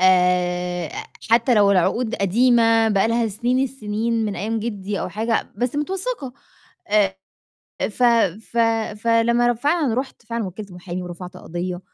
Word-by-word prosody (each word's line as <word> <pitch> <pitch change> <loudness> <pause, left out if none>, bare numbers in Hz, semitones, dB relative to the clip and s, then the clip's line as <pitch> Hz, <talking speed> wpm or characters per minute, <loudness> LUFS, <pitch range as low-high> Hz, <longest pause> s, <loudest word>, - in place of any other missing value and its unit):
آآ، 180 -2 +2 0.4
حتّى 235 +2 +4
لو 205 -2 +5
العقود 220 +5 +1
قديمة 225 +2 +3
بقى 210 +1 +2
لها 230 0 +1
سنين 240 +5 0
السنين 230 -2 -2
من 205 -2 -3
أيام 220 +3 -2
جدي 205 -3 -4
أو - - -3
حاجة، 225 +4 -2
بس 245 +3 -1
متوثّقة، 375 - -3 0.6
آآ، 200 -2 +2 0.8
ف 250 - -5 0.5
ف - - -10 0.5
فلمّا 235 +1 +3
ر 240 - +2
فعلًا 285 0 +1
رُحت 260 -1 -4
فعلًا 230 -1 -3
وكّلت 195 +1 -8
محامي 180 0 -6
ورفعت 180 +1 -8
قضية، 175 0 -5
220 Hz, 140 wpm, -22 LUFS, 185-235 Hz, 0.8 s, لو